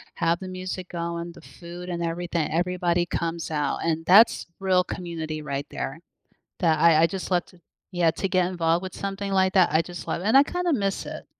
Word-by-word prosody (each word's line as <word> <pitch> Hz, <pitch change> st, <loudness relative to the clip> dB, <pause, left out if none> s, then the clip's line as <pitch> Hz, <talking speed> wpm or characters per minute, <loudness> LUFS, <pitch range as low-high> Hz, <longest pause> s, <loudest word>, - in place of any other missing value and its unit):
have 165 Hz, +1 st, +1 dB
the 190 Hz, -, -7 dB
music 185 Hz, 0 st, -6 dB
going, 170 Hz, 0 st, -4 dB
the -, -, -14 dB
food 175 Hz, +1 st, -10 dB
and 170 Hz, -1 st, -3 dB
everything 170 Hz, -1 st, -2 dB
everybody 175 Hz, 0 st, +1 dB
comes 170 Hz, 0 st, -3 dB
out, 150 Hz, -2 st, -1 dB
and 165 Hz, 0 st, -1 dB
that's 205 Hz, +7 st, +6 dB
real 185 Hz, -1 st, +3 dB
community 160 Hz, -4 st, -5 dB
right 140 Hz, -1 st, -4 dB
there, 135 Hz, +4 st, -5 dB, 0.6 s
that 160 Hz, -4 st, +2 dB
I 165 Hz, -1 st, +6 dB
I, -, -, +6 dB
just, 190 Hz, 0 st, -6 dB
love 180 Hz, 0 st, +2 dB
to 180 Hz, -2 st, -21 dB, 0.3 s
yeah, 175 Hz, -3 st, +2 dB
to 195 Hz, -, -2 dB
get 185 Hz, -2 st, +2 dB
involved 170 Hz, -1 st, 0 dB
with 185 Hz, -, -6 dB
something 195 Hz, 0 st, -4 dB
like 190 Hz, -1 st, +2 dB
that. 185 Hz, -3 st, +5 dB
I 160 Hz, -, +4 dB
just 175 Hz, 0 st, -8 dB
love 170 Hz, -, -2 dB
it, -, -, -6 dB
and 220 Hz, -, +3 dB
I 275 Hz, -, +8 dB
kinda 355 Hz, +1 st, -1 dB
miss 200 Hz, -5 st, -1 dB
it -, -, -7 dB
175 Hz, 210 wpm, -25 LUFS, 165-185 Hz, 0.6 s, I